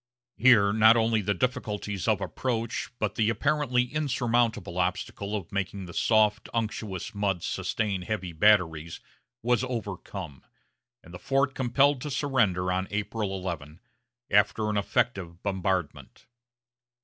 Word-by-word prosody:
Here 105 -3 +5
not 110 +2 +6
only 115 -1 +2
the 100 +1 0
difficulties 105 -6 -2
of - - +2
approach, 115 -3 -2
but 105 -3 -1
the 110 -1 +1
apparently 125 +1 +1
insurmountable 120 - 0
obstacle 95 +3 -2
of 95 -5 -5
making 100 -1 -3
the 85 - -10
soft, 110 +1 +2
unctuous 110 -3 -3
mud 100 -4 -1
sustain 100 -4 -2
heavy 95 -3 -4
batteries, 80 -3 +2 0.4
was 120 +1 +2
overcome, 100 - -6 0.6
and 85 - -14
the 90 - -8
fort 135 0 +1
compelled 135 +2 +2
to 150 - -4
surrender 120 -11 +1
on 95 +1 -1
April 105 -1 -2
11, 80 -4 -6 0.5
after 105 -1 +3
an 105 - -1
effective 95 -4 -1
bombardment. 95 -4 -2
105 Hz, 125 wpm, -27 LUFS, 95-120 Hz, 0.6 s, not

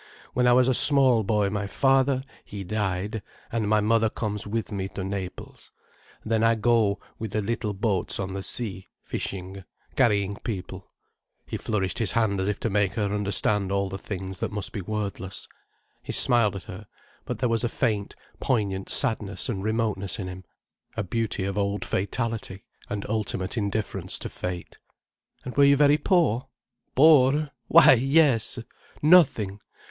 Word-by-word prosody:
When 125 0 +2
I 120 - +6
was 125 0 +4
a 130 - +3
small 130 -4 +6
boy 105 -1 +1
my 100 -1 -2
father, 135 +2 +2 0.2
he 100 -1 -7
died, 100 +1 -2 0.3
and 110 -3 -1
my 105 0 +3
mother 110 +1 +2
comes 105 -2 -3
with 110 +1 -3
me 95 -2 -3
to 95 - -6
Naples. 95 -1 -7 0.5
Then 110 0 +1
I 115 0 +4
go 110 -2 +2 0.2
with 110 -2 -5
the 110 - 0
little 110 -1 -2
boats 95 -3 -1
on 95 -1 -3
the 100 - -4
sea—fishing, 95 -2 -5 0.3
carrying 100 -5 +2
people—" 95 -4 -6 0.6
He - - -6
flourished 95 -5 -2
his 110 -5 +1
hand 105 -4 +1
as 95 - -1
if 105 0 -1
to 115 - 0
make 100 -1 +1
her 105 -3 -1
understand 100 -1 +1
all 100 0 0
the 95 0 -6
things 95 -1 -6
that - - -2
must 105 -1 -3
be 100 - -5
wordless. 100 -1 -5 0.5
He - - -6
smiled 115 -5 +3
at 95 - -6
her—but 100 +3 -10
there 125 - 0
was 115 0 0
a 120 - +1
faint, 110 -5 -1 0.2
poignant 100 -6 -1
sadness 110 -5 0
and 95 -5 -3
remoteness 110 -3 -1
in 95 -4 -5
him, 90 0 -8 0.5
a - - 0
beauty 110 0 -2
of 100 +1 -2
old 100 0 -1
fatality, 105 -1 -3 0.3
and 100 -1 -4
ultimate 105 -3 -2
indifference 105 -1 -2
to - - -6
fate. 90 -1 -6 0.7
"And 125 - -6
were 140 - +5
you 140 0 +6
very 145 +1 +4
poor?" 140 - +2 0.5
"Poor?—why 150 +2 +5
yes! 135 -2 +3 0.5
Nothing. 130 - +4
105 Hz, 160 wpm, -25 LUFS, 100-115 Hz, 0.7 s, I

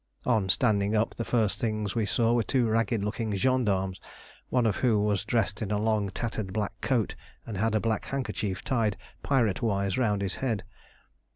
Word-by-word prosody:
On 110 -6 +2
standing 105 -1 +2
up, 110 +1 +1
the 115 - -4
first 110 -4 +1
things 110 -3 -1
we 110 -3 0
saw 115 +2 +2
were 120 - +3
two 120 +2 +1
ragged 115 -1 +1
looking 105 0 -2
gendarmes, 100 -5 +1 0.5
one 125 -2 +2
of 105 -3 +1
whom 110 -5 +2
was 100 -2 +1
dressed 110 -2 0
in 105 - -2
a 105 - +1
long 105 -1 +1
tattered 110 -1 -3
black 105 0 -2
coat, 120 -6 +1 0.3
and 110 - -5
had 110 +3 +1
a - - +4
black 110 -1 -1
handkerchief 105 -8 -3
tied 115 -7 0 0.2
pirate 120 -8 +1
wise 100 -2 0
round 105 -5 +1
his 95 -1 -2
head. 115 -7 -1
110 Hz, 185 wpm, -28 LUFS, 100-115 Hz, 0.5 s, a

